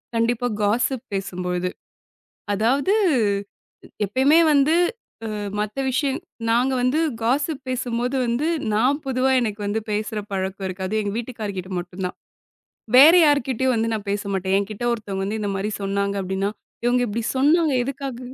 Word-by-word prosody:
கண்டிப்பா 235 +1 +1
காஸ்ஸிப் 240 +5 +1
பேசும்பொழுது. 180 -2 -2 0.8
அதாவது 265 - +2 1.1
எப்பயுமே 265 - +3
வந்து 290 +2 +4 0.6
அ 215 - -4 0.2
மத்த 210 +3 -3
விஷயம் 270 +1 0 0.3
நாங்க 245 +3 +2
வந்து 255 +5 +2 0.2
காஸ்ஸிப் 280 +4 0
பேசும்போது 245 0 -2
வந்து, 240 +6 0 0.3
நான் 265 +7 +2
பொதுவா 265 0 +1
எனக்கு 215 -3 -3
வந்து 220 +2 -1
பேசுற 210 +1 -2
பழக்கம் 190 0 -3
இருக்காது. 185 +1 -5
அது 215 - +1
எங்க 200 - -3
வீட்டுக்காருகிட்ட 210 -6 -5
மட்டும் 175 +2 -7
தான். - - -10 0.8
வேற 295 +5 +10
யார்க்கிட்டயும் 260 -3 +2
வந்து 225 0 0
நான் 210 -1 -6
பேச 205 0 -2
மாட்டேன். 190 0 0
என்கிட்ட 200 +3 -5
ஒருத்தவுங்க 200 -4 -4
வந்து 215 +2 -3
இந்தமாரி 200 0 -2
சொன்னாங்க 200 0 -1
அப்பிடின்னா, 190 +2 -2 0.3
இவுங்க 245 0 +3
இப்பிடி 220 +2 -3
சொன்னாங்க 305 +3 +3
எதுக்காக? 270 -1 -5
230 Hz, 135 wpm, -23 LUFS, 200-260 Hz, 1.1 s, வேற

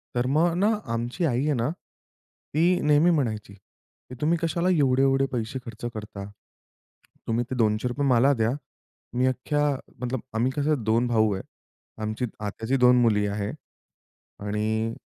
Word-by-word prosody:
तर 120 0 +1
मग 170 +1 +3
ना 205 +4 +3 0.2
आमची 120 +9 -2
आई 130 -3 +1
आहे 150 - +2
ना 120 +1 0 0.8
ती 175 +3 +3
नेहमी 150 +3 +4
म्हणायची, 110 -10 -1
की 100 +5 -17
"तुम्ही 165 +3 +2
कशाला 170 +2 0
एवढे-एवढे 135 -4 +3
पैसे 120 +1 -3
खर्च 115 0 -8
करता? 105 -2 -7 1.0
तुम्ही 115 +1 +1
ते - - -1
200 110 0 +1
रुपये 140 +4 -1
मला 130 +2 +5
द्या. 115 -2 +1 0.6
मी 125 +1 +1
अख्ख्या-" 145 +2 0 0.2
मतलब 125 -1 -2
आम्ही 120 +4 +1
कसं 145 -3 +1
2 115 +3 +2
भाऊ 110 -3 +2
आहे. 95 - -4 0.6
आमची 110 +3 -2
आत्याची 110 +5 -2
2 125 -1 +6
मुली 105 -3 +3
आहे. 100 0 -2 0.9
आणि 110 +2 -1
125 Hz, 145 wpm, -26 LUFS, 110-145 Hz, 1.0 s, 2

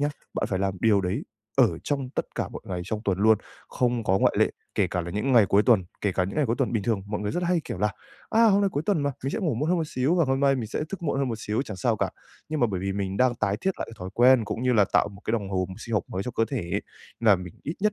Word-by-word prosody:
nhá, 145 - +2 0.3
bạn - - 0
phải 95 - -1
làm 95 -1 -1
điều 105 -3 +4
đấy 95 +1 -2 0.3
ở 110 -11 +4
trong 135 -3 -2
tất - - -2
cả - - -2
mọi - - -9
ngày 90 -2 -3
trong 105 +2 -3
tuần 95 -2 0
luôn, 110 +1 +5 0.3
không 120 -2 0
có 95 0 +3
ngoại - - +3
lệ, - - +4 0.2
kể 100 - +2
cả 90 - -1
là 85 0 -5
những 105 +8 -1
ngày 115 -5 +6
cuối 100 +3 +4
tuần, 110 -7 +4 0.2
kể 100 -2 0
cả 90 - +1
những 95 - -5
ngày 150 -3 +2
cuối 115 +1 0
tuần. - - 0
Bình 110 - 0
thường 105 -2 0
mọi 105 0 -3
người 105 0 -2
rất 175 - -1
hay, 175 -1 +2
kiểu, - - -5
là 105 0 +1 0.4
"A, 225 +1 +5
hôm 200 0 +4
nay 200 -1 +2
cuối 145 - -1
tuần 185 -8 +2
mà, 140 - +1
mình 135 - 0
sẽ - - -1
ngủ 165 - 0
muộn 150 +7 -1
hơn 180 -1 +2
một 160 - -1
xíu 135 +5 0
và 170 -3 +3
hôm 135 0 0
nay 140 -1 +4
mình 115 -3 -3
sẽ - - -4
thức 195 -3 -6
muộn 145 -3 0
hơn 135 -2 0
một 115 - -2
xíu, 110 +3 -1
chẳng 105 -7 -7
sao 90 - +1
cả." - - -1 0.4
Nhưng 155 -1 -2
mà 120 - +5
bởi 95 -4 -3
vì 95 0 -2
mình 100 -1 -3
đang 125 0 +3
tái 100 -2 0
thiết 190 - +1
lại - - -3
cái 115 - -11
thói 90 +1 -6
quen 125 -1 +6
cũng 110 +3 -4
như 125 0 +2
là 105 -4 +5
tạo - - +4
một 100 0 -13
cái - - -1
đồng 100 -4 -1
hồ 95 -2 0
sinh 115 -1 -4
học 100 - +2
mới 95 - -3
cho 125 - -4
cơ 115 - +1
thể, 110 -11 -2 0.4
là 105 -4 +5
mình 90 -2 -9
ít 155 - -4
nhất 210 0 +2
115 Hz, 320 wpm, -26 LUFS, 100-135 Hz, 0.4 s, ngày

